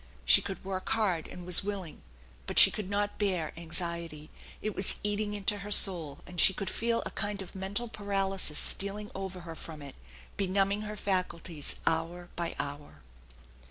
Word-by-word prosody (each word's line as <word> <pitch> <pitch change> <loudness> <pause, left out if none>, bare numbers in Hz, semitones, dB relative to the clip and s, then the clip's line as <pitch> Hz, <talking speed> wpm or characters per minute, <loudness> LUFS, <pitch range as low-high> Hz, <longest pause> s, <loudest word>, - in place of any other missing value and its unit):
She - - +8
could 195 -2 -6
work 190 -1 -3
hard 190 -8 +1
and 180 -1 -9
was 180 +1 +5
willing; 195 -5 -5 0.5
but - - -4
she - - +10
could 205 -3 -5
not 205 0 -1
bear 185 -6 0
anxiety. 170 -2 -4 0.3
It 215 -2 -3
was 190 - +3
eating 210 0 -1
into 205 0 -1
her 200 +2 -7
soul, 175 -8 +5
and 180 -1 -1
she 190 - +5
could 195 - -3
feel 230 0 0
a - - -3
kind 205 -1 -3
of 190 - -7
mental 195 +5 -2
paralysis 195 -6 -1
stealing 205 +1 0
over 190 -1 -5
her 165 -1 -7
from 155 -2 -7
it, 140 - -8 0.4
benumbing 195 +1 +1
her 210 0 -5
faculties 180 -6 -2
hour 170 +2 -1
by 170 0 -2
hour. 145 - -6
190 Hz, 170 wpm, -30 LUFS, 170-205 Hz, 0.5 s, she